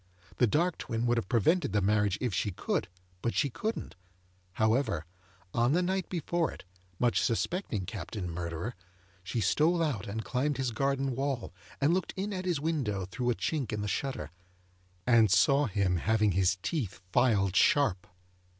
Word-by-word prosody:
The 125 - +4
dark 165 - +1
twin 115 +1 -2
would 120 0 +3
have 110 - -7
prevented 140 - +2
the 105 - +3
marriage 105 -1 +2
if 125 -5 -1
she 90 - 0
could, 90 - -2 0.3
but 120 - -1
she 140 -2 +1
couldn't; 215 - -3 0.6
however, 110 - +1 0.5
on 120 +4 +2
the 180 +2 +3
night 190 +1 -1
before 170 -1 -1
it, - - -11 0.3
much 120 +3 +2
suspecting 115 - -1
Captain 100 0 -5
Murderer, 85 +5 -4 0.5
she 105 +6 -2
stole 155 - +3
out 120 - -2
and 110 +3 -4
climbed 140 +2 0
his 130 -2 -1
garden 135 +2 0
wall, 135 -8 -2 0.3
and 145 +4 +3
looked 185 0 -1
in 200 +2 -2
at 185 -1 -4
his 175 -5 0
window 135 - -1
through 120 +7 -2
a 120 - +2
chink 145 -3 -2
in 105 -1 -2
the 105 - -2
shutter, 105 - -3 0.7
and 115 -3 +5
saw 140 +8 +4
him 95 -3 +1
having 105 +3 +2
his 95 0 +2
teeth 135 - -2
filed 105 -6 +3
sharp. 120 -11 +3
120 Hz, 170 wpm, -30 LUFS, 100-145 Hz, 0.7 s, and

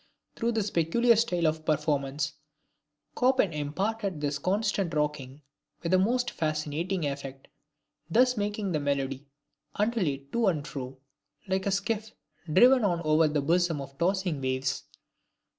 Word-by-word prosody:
Through 235 +1 0
his 210 -2 0
peculiar 230 +9 +3
style 180 -7 +1
of 155 0 0
performance, 150 -2 0 0.9
Chopin 250 -8 +3
imparted 190 +5 -2
this 145 -1 -2
constant 195 -2 0
rocking 150 -2 -2 0.4
with 170 - -1
the 185 - +5
most 245 +6 +1
fascinating 155 +3 -2
effect; 140 -1 -5 0.6
thus 250 +7 +4
making 205 -2 -2
the 155 - 0
melody 140 -1 -2 0.5
undulate 180 -11 -1
to 235 -2 +1
and 155 -6 0
fro, 130 -1 -6 0.5
like 190 +1 0
a - - +1
skiff 215 +2 -2 0.4
driven 245 +8 +6
on 175 -4 +1
over 155 +1 +4
the 150 -1 0
bosom 170 +1 +1
of 135 0 -8
tossing 180 -4 0
waves. 130 0 -1
165 Hz, 135 wpm, -28 LUFS, 145-205 Hz, 0.9 s, driven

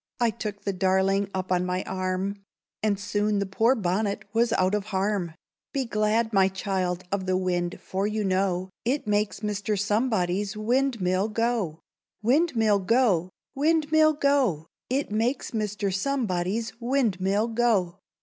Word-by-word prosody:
I 235 -2 +3
took 210 -2 -6
the 200 - -1
darling 190 +1 +2
up 185 -1 -4
on 180 -1 +2
my 180 +1 -1
arm, 185 +2 -3 0.4
And 205 -2 +1
soon 205 0 0
the 200 - 0
poor 225 +7 +2
bonnet 200 0 -1
was 230 +1 +2
out 185 +1 +2
of 210 -1 0
harm. 195 -4 -1 0.4
"Be 275 -2 0
glad, 220 +1 +1
my 190 -1 +5
child, 190 -2 -2
of 195 -2 -2
the 185 0 +2
wind, 175 -2 -1
for 195 +2 -2
you 215 0 -1
know, 185 -1 0
It 260 +4 0
makes 210 0 0
Mr. 210 0 -1
Somebody's 205 -2 0
windmill 215 -5 +1
go!" 225 -5 0 0.5
Cho.—Windmill 230 -5 +3
go! 195 -4 +2 0.2
windmill 310 +1 +3
go! 275 - +1 0.2
It 270 -2 -1
makes 230 +6 -1
Mr. 210 -3 -2
Somebody's 215 -2 -1
windmill 220 -4 +1
go. 215 -6 +1
205 Hz, 140 wpm, -26 LUFS, 190-230 Hz, 0.5 s, my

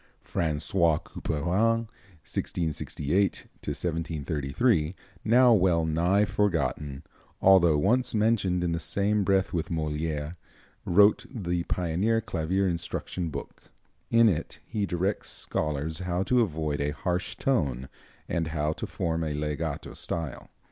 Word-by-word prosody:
François 80 +1 +1
Couperin 100 +9 0 0.4
(1668 85 +3 -1 0.2
1733), 80 - -1 0.3
now 120 +2 +6
well 90 -5 +3
nigh 85 +6 +2
forgotten, 75 -8 -1 0.4
although 85 -5 +6
once 120 +10 +2
mentioned 105 -5 +2
in 85 - 0
the 85 - -1
same 100 +4 +1
breath 95 0 +2
with 80 -2 -1
Molière, 75 -1 -2 0.5
wrote 100 +4 +4
the 90 -8 -2
pioneer 90 +6 +1
clavier 95 -2 0
instruction 85 0 -3
book. 70 -2 -8 0.4
In 115 0 +6
it 85 -6 -1
he 105 -2 -2
directs 95 +4 -1
scholars 75 +2 -2
how 90 0 -1
to 125 +4 +3
avoid 75 -7 -1
a 70 - 0
harsh 85 +6 -2
tone, 70 - 0 0.4
and 85 -2 -1
how 75 -1 -1
to - - -5
form 80 -1 -2
a 75 -2 -2
legato 75 0 -3
style. 80 -6 -5
85 Hz, 120 wpm, -27 LUFS, 75-100 Hz, 0.5 s, now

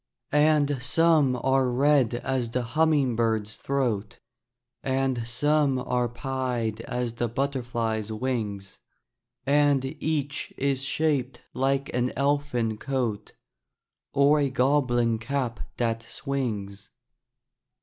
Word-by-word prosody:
And 150 -2 +3
some 150 0 +3
are 135 -1 +3
red 130 -1 +3
as 125 -1 -2
the 125 +1 -1
humming 145 -1 +2
bird's 110 -2 0
throat, 120 -7 -2 0.6
And 130 -3 -1
some 145 +3 +2
are 125 -1 0
pied 120 -3 -2
as 125 -2 -2
the 120 0 -1
butterfly's 120 -4 -2
wings, 105 -5 -3 0.7
And 145 -1 +3 0.2
each 145 -2 -2
is 135 -1 0
shaped 135 -3 0
like 135 +1 0
an 125 +1 0
elfin 140 -6 0
coat, 125 -6 -2 0.8
Or 145 +2 +4
a 140 -1 +1
goblin 125 -4 +2
cap 120 -1 -2 0.2
that 115 -1 0
swings. 110 -6 -4
130 Hz, 105 wpm, -26 LUFS, 115-140 Hz, 0.8 s, Or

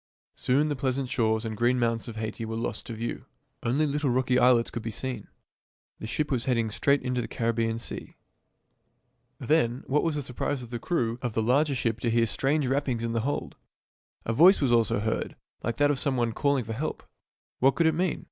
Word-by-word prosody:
Soon 145 +4 +1
the 145 - -1
pleasant 130 0 -1
shores 110 -2 +1
and 110 -1 -3
green 120 +3 +2
mountains 115 -1 0
of 115 - -7
Haiti 110 +1 -4
were 110 0 -4
lost 115 - -4
to 115 - -5
view. 115 +2 -5 0.4
Only 135 +6 +1
little 145 -1 0
rocky 125 0 +2
islets 125 -2 +4
could 120 - -4
be 115 - -4
seen. 115 0 -4 0.7
The 110 - -6
ship 150 +6 -2
was 125 -3 0
heading 115 -4 +1
straight 140 +6 +2
into 125 -1 -1
the - - -5
Caribbean 115 -1 -1
Sea. 115 - -6 1.2
Then, 130 -5 +1
what 150 +2 +2
was 165 -2 0
the 145 - -2
surprise 130 +1 -3
of 120 - -11
the 120 - -3
crew 120 -5 -1
of 120 -3 -2
the 110 - +1
larger 140 +5 +2
ship 115 -2 -1
to 115 - 0
hear 115 0 +3
strange 140 +6 0
rappings 130 -3 0
in 115 - -1
the 115 - 0
hold! 140 +5 -3 0.7
A 115 - 0
voice 175 - +7
also 125 -4 +4 0.2
was 105 - -2
heard, 110 0 -2 0.3
like 115 0 -3
that 145 0 +4
of 140 - -1
some 140 -3 0
one 120 -1 +1
calling 140 -2 +1
for 115 +1 -5
help. - - -4 0.6
What 135 +1 +4
could 170 - +2
it 160 - +4
mean? 175 +2 0
125 Hz, 215 wpm, -27 LUFS, 115-140 Hz, 1.2 s, voice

